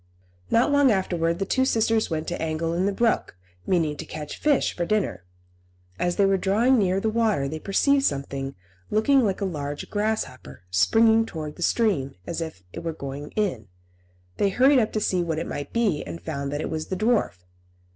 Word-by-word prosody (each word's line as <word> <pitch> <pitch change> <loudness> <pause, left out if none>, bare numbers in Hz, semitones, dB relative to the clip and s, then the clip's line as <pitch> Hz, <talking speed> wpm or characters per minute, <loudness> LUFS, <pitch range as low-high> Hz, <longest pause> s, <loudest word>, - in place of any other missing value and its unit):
Not 240 +5 +3
long 285 -1 +5
afterwards 170 -4 0
the 195 - -1
two 260 +6 +1
sisters 225 -3 +2
went 160 -2 -3
to - - -4
angle 160 +1 -1
in 180 +3 +1
the - - +1
brook, 225 - 0 0.3
meaning 165 -5 +1
to - - -5
catch 150 -1 -7
fish 295 -3 +2
for 175 - -1
dinner. 200 - -1 0.7
As 175 0 0
they 200 - +3
were 195 0 +3
drawing 225 +7 +3
near 190 -1 +2
the 220 +2 0
water 215 -11 +1
they 155 +3 -5
perceived 275 - +2
something, 140 - -2 0.3
looking 255 +5 +3
like 200 -2 -1
a - - +1
large 145 -5 -5
grasshopper, 205 - -3
springing 225 - +4
towards 155 -5 -6
the - - -12
stream, 175 - +1
as 170 - -4
if 160 -13 -6
it - - -5
were 165 -1 -2
going 140 0 -7
in. 175 - -1 0.7
They 200 - +2
hurried 260 +7 +5
up 220 -2 0
to 215 - 0
see 185 -3 +1
what 165 -2 -2
it 165 - -2
might 145 0 -5
be, 210 -10 +1
and 85 -2 -7
found 140 - -4
that 145 +1 -2
it - - -3
was 155 0 -3
the 185 - -3
dwarf. 215 - 0
185 Hz, 195 wpm, -25 LUFS, 150-220 Hz, 0.7 s, long